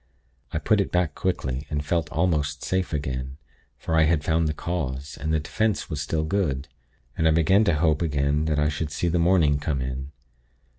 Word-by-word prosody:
I - - -1
put 105 -2 +2
it 100 - -3
back, 90 -4 +1
quickly, 70 -7 -2
and 75 -1 -2
felt 80 -1 0
almost 75 -5 0
safe 95 -1 -1
again, 65 -3 -3 0.4
for 80 - -2
I 80 -1 +5
had 80 -2 +2
found 80 0 +2
the 75 - -1
cause, 75 -5 -4
and 80 - -1
the 80 - +2
'defense' 105 +6 -1
was 75 -2 -2
still 80 +3 -1
good. 80 -6 -1 0.5
And 80 - +2
I - - +5
began 85 +6 +4
to 85 - +3
hope 75 -1 +2
again 75 -1 +1
that 80 -2 0
I 75 0 +3
should 75 0 -2
see 85 +4 -1
the 85 +1 +1
morning 85 -5 +3
come 70 -2 -1
in. 65 +2 -4
80 Hz, 200 wpm, -25 LUFS, 70-85 Hz, 0.5 s, I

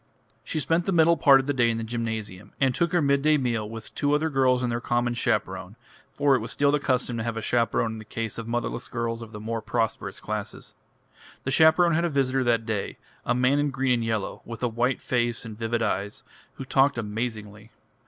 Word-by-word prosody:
She 155 - -3
spent 165 +3 0
the - - +2
middle 170 -1 +5
part 140 -3 +6
of - - -10
the 145 - 0
day 120 -3 +3
in 115 - -1
the 115 - -3
gymnasium, 110 -4 -5
and 135 -2 +3
took 170 +5 0
her 175 -3 +2
midday 140 +2 +3
meal 115 -5 -1
with 115 0 -9
two 145 0 0
other 155 +1 0
girls 130 -2 +2
and 120 - 0
their 120 0 -2
common 120 0 0
chaperone 120 - -2 0.4
for 140 -1 +2
it - - +1
was - - -6
still 140 0 +2
the 150 - +2
custom 125 -3 0
to 115 - -2
have 115 -1 -3
a - - -2
chaperone 115 -1 +1
in 110 - -7
the - - -9
case 110 0 -4
of 115 - -6
motherless 120 0 -3
girls 115 -1 -3
of 115 -1 -9
the 105 - -8
more 115 +1 -3
prosperous 110 +1 -2
classes. - - -5 0.7
The 130 - -2
chaperone 160 +4 +5
had 170 +2 +2
a 170 - +1
visitor 135 -2 +1
that 115 -2 +2
day, 110 -3 -3 0.3
a - - +2
man 125 +3 +3
in 145 0 +1
green 135 -1 +1
and 120 -1 0
yellow, 110 -3 -2
with 115 +1 -8
a - - +3
white 120 +3 -1
face 120 -2 -1
and 110 -2 -7
vivid 115 +1 -1
eyes, 105 +5 -2 0.3
who 135 - -7
talked 135 0 +3
amazingly. 105 -1 -5
120 Hz, 225 wpm, -26 LUFS, 115-140 Hz, 0.7 s, part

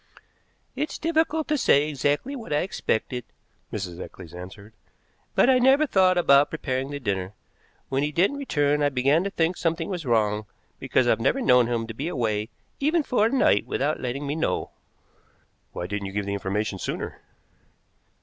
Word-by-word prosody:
"It's 300 - -3
difficult 320 -1 0
to 300 -1 +1
say 145 - +4
exactly 145 - -1
what 235 - -8
I 150 - +2
expected," 125 - -2 0.5
Mrs. 95 -4 -5
Eccles 85 -3 -10
answered, 95 +4 -10 0.6
"but - - +5
I 260 -1 +5
never 270 +4 +5
thought 185 -8 +3
about 140 -4 +5
preparing 135 -3 -3
the 145 0 -5
dinner. 100 -5 -2 0.6
When 135 +1 0
he 150 +1 0
didn't 195 - +2
return 150 - +1
I 145 - +3
began 140 +5 +2
to - - 0
think 175 -1 0
something 165 +1 -1
was 180 -4 -3
wrong, 105 -4 +1 0.3
because 130 - +1
I've 115 - +3
never 260 - +2
known 125 - +4
him 115 -1 -1
to 115 - -7
be 140 +8 -4
away 110 -9 -1 0.3
even 310 +3 +2
for 225 -6 +2
a - - -1
night 120 - +3
without 145 +4 -1
letting 130 +3 -3
me 140 - -2
know." 160 - -1 1.0
"Why 85 - -5
didn't 100 +1 -4
you 95 - -8
give 100 0 -2
information 100 0 -2
sooner?" - - -5
140 Hz, 170 wpm, -25 LUFS, -, 1.0 s, but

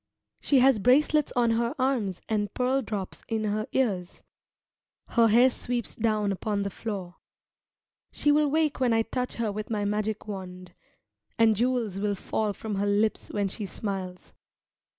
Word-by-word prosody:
She 275 -3 +4
has 260 -3 +5
bracelets 290 +6 +3
on 240 -2 +3
her 235 +1 0
arms 250 -9 0
and 210 -2 -1
pearl 255 +2 +1
drops 205 -5 -5
in 220 -1 -1
her 215 +2 -1
ears; 195 -9 -1 0.9
her 230 -1 +4
hair 240 +4 +5
sweeps 240 -1 -3
down 215 -2 +1
upon 200 +1 -2
the 200 - -3
floor. 190 -4 -6 0.9
She 295 - +2
will 295 0 +3
wake 310 -1 +1
when 250 -3 +2
I 225 0 +3
touch 250 +2 -3
her 225 -3 -1
with 210 +1 -5
my 210 -2 -1
magic 210 +1 -2
wand, 185 -3 -7 0.6
and 225 -1 +5
jewels 235 -4 0
will 205 0 0
fall 210 +2 -2
from 210 0 -5
her 200 +1 0
lips 210 +2 +1
when 205 -1 -1
she 200 +1 -5
smiles. 190 -3 -5
220 Hz, 160 wpm, -27 LUFS, 200-245 Hz, 0.9 s, has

